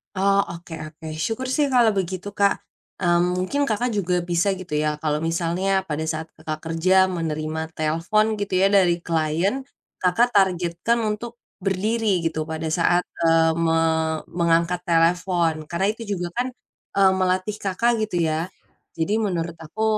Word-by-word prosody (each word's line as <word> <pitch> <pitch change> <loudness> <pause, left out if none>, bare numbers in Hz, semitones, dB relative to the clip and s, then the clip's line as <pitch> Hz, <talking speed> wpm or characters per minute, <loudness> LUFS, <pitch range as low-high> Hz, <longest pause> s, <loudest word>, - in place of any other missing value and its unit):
Oh, 195 +1 +3
oke 170 0 -9
oke, 160 +1 -11 0.2
syukur 240 +3 -3
sih 295 -1 +2
kalau 235 -3 +5
begitu, 185 0 -3
Kak. 200 0 +2 0.4
Mmm, 175 +1 +3
mungkin 185 +11 -1
Kakak 235 +3 0
juga 180 -2 0
bisa 175 +3 +2
gitu 180 -2 -10
ya, 150 0 0
kalau 150 -1 0
misalnya 175 +4 0
pada 160 -3 -3
saat 160 0 -5
Kakak 155 0 -5
kerja 165 +3 +2 0.2
menerima 160 -2 -3
telepon, 165 +7 +1
gitu 200 -1 -3
ya, 195 +1 +4
dari 175 -4 +3
klien, 170 - 0 0.3
Kakak 230 +7 +2
targetkan 185 +2 +1
untuk 220 +2 -3 0.2
berdiri 195 0 0
gitu, 160 -1 -2
pada 160 0 -4
saat, 175 +2 +2 0.2
eee, 165 0 +4
me 165 -1 +2 0.6
mengangkat 170 +1 +2
telepon. 170 -1 +2
Karena 170 +4 -1
itu 225 - -12
juga 175 -1 -3
kan, 250 +1 +1 0.5
e - - +1 0.2
melatih 185 +2 0
Kakak, 200 +5 +1 0.2
gitu 210 - -6
ya. 160 +1 0 0.5
Jadi 165 +5 -1
menurut 170 -6 -2
aku, 165 +7 -5
175 Hz, 150 wpm, -23 LUFS, 165-200 Hz, 0.6 s, kalau